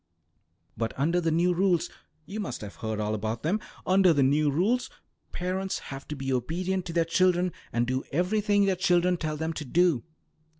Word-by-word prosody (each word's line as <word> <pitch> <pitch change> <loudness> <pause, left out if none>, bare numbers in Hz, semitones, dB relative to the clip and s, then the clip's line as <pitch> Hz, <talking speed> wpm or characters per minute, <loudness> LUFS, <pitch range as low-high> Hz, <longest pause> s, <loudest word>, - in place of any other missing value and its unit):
But 115 -1 -2
under 165 +6 +2
the 165 - +1
new 175 +3 +2
rules 180 -1 +2 0.4
you 205 +4 -6
must 205 - -4
have 105 -2 -8
heard 110 -1 -3
all 105 0 -1
about 110 +2 -3
them 180 +8 +1 0.3
under 185 -2 +5
the 140 -2 +3
new 145 +3 +3
rules 215 - +1 0.4
parents 185 +2 -2 0.2
have 135 0 -8
to 150 - -4
be 135 -1 -2
obedient 180 +9 -1
to 170 - -5
their 165 -1 +2
children, 180 +1 +2 0.2
and 120 0 +1
do 130 +2 -1
everything 205 +5 +2
their 195 -1 +2
children 180 -1 +3
tell 155 -3 -3
them 160 +1 -2
to 155 - -5
do." 160 -2 +2
170 Hz, 185 wpm, -27 LUFS, 135-185 Hz, 0.4 s, under